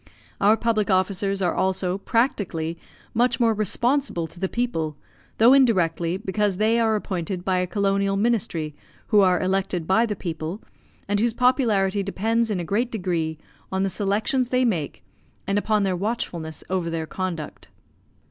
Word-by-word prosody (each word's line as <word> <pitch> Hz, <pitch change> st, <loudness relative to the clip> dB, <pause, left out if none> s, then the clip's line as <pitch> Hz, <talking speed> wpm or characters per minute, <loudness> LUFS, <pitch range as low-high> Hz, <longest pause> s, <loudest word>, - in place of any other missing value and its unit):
Our 210 Hz, +3 st, +5 dB
public 220 Hz, -3 st, 0 dB
officers 195 Hz, +1 st, +1 dB
are 175 Hz, -, +1 dB
also, 190 Hz, 0 st, 0 dB
practically, 195 Hz, -, 0 dB, 0.4 s
much 235 Hz, +1 st, +2 dB
more 230 Hz, -2 st, +4 dB
responsible 225 Hz, -, 0 dB
to 170 Hz, -, -14 dB
the 190 Hz, 0 st, -1 dB
people, 165 Hz, -12 st, -2 dB, 0.4 s
though 235 Hz, +4 st, +7 dB
indirectly, 180 Hz, -9 st, +3 dB
because 200 Hz, -1 st, -1 dB
they 220 Hz, +3 st, +2 dB
are 220 Hz, -1 st, +2 dB
appointed 185 Hz, -3 st, -3 dB
by 185 Hz, -1 st, +1 dB
a 180 Hz, -, 0 dB
Colonial 195 Hz, +1 st, +1 dB
Ministry 195 Hz, -9 st, 0 dB, 0.4 s
who 210 Hz, -, +5 dB
are 185 Hz, -3 st, +4 dB
elected 185 Hz, -2 st, -1 dB
by 225 Hz, +7 st, +3 dB
the 210 Hz, -, -2 dB
people, 165 Hz, +1 st, -5 dB, 0.5 s
and 205 Hz, 0 st, +1 dB
whose 230 Hz, +1 st, +1 dB
popularity 215 Hz, -6 st, +2 dB
depends 225 Hz, +4 st, 0 dB
in 200 Hz, -4 st, -1 dB
a -, -, -2 dB
great 215 Hz, +8 st, 0 dB
degree 170 Hz, -6 st, -2 dB, 0.3 s
on 190 Hz, 0 st, 0 dB
the 195 Hz, -, 0 dB
selections 220 Hz, +6 st, 0 dB
they 255 Hz, 0 st, +2 dB
make 175 Hz, -11 st, -2 dB, 0.4 s
and 200 Hz, +1 st, +1 dB
upon 210 Hz, 0 st, +1 dB
their 190 Hz, -2 st, +1 dB
watchfulness 175 Hz, -6 st, -3 dB
over 180 Hz, -3 st, -1 dB
their 165 Hz, -1 st, -3 dB
conduct. 170 Hz, -2 st, -5 dB
195 Hz, 155 wpm, -24 LUFS, 180-225 Hz, 0.5 s, though